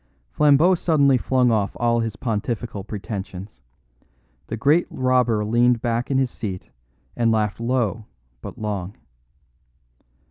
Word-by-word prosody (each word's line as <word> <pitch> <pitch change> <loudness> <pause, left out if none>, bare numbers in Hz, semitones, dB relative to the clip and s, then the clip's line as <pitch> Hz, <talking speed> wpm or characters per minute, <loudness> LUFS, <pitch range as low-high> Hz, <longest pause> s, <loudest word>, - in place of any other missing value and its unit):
Flambeau 150 +5 +4
suddenly 150 -6 +3
flung 125 -1 +2
off 105 -3 -1
all 120 0 +2
his 115 -2 -2
pontifical 110 -2 -3
pretensions. 95 -3 -7 0.9
The 115 - -4
great 145 +8 +3
robber 125 -4 +1
leaned 120 +2 +3
back 120 +1 -2
in 135 - +1
his 130 -2 +1
seat 95 -5 -6 0.4
and 115 -1 +2
laughed 105 -2 0
low 115 -3 -1 0.4
but - - -9
long. 100 -2 -4
115 Hz, 120 wpm, -22 LUFS, 105-130 Hz, 0.9 s, Flambeau